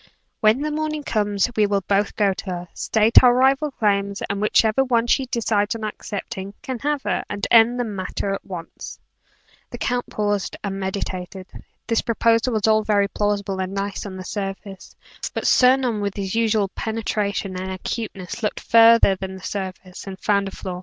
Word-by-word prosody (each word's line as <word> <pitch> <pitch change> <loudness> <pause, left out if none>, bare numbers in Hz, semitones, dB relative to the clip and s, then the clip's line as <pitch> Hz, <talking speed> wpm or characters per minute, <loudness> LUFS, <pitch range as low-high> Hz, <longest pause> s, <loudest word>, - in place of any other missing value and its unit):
When 220 +5 +3
the 305 +1 -2
morning 305 0 -2
comes, 205 -4 0
we 210 -1 +3
will 200 -1 +1
both 200 +1 +1
go 200 -2 +2
to - - -8
her 190 - -4
together - - -30
state 220 +1 +4
our 245 -1 +5
rival 270 +4 +3
claims 200 -5 0
and 200 0 -3
whichever 220 +3 +3
one 240 -3 +1
she 260 +2 +1
decides 220 -3 0
on 225 - -6
accepting, 200 -2 -6
can 260 -2 -4
have 290 0 -1
her, - - -1
and 205 0 -3
end 235 +1 +6
the - - +1
matter 200 -2 -3
at 195 - -5
once." 175 -3 -8 0.7
The - - -7
count 245 0 -2
paused 205 -2 -2
and 195 -1 -3
meditated. 190 -1 -4 0.4
This 230 -1 +1
proposal 230 +1 +2
was 215 -2 +1
all 220 0 +4
very 205 -2 +2
plausible 200 -2 -1
and 190 +1 -4
nice 200 0 -3
on 190 -1 -8
the 185 - -7
surface, 195 -1 -6 0.4
but - - -3
Sir 255 0 +6
Norman 240 -5 -1
with 200 -1 -2
his 195 -2 -4
usual 220 -3 +1
penetration 210 -3 -2
and 185 +1 -4
acuteness, 195 +1 -5
looked 210 - -2
farther 230 -3 +6
than 190 0 -6
the 190 - -12
surface, 185 -1 -6
and 190 -1 -7
found 200 -1 +1
a - - -6
flaw. 180 -2 -6
205 Hz, 185 wpm, -22 LUFS, 195-230 Hz, 0.7 s, end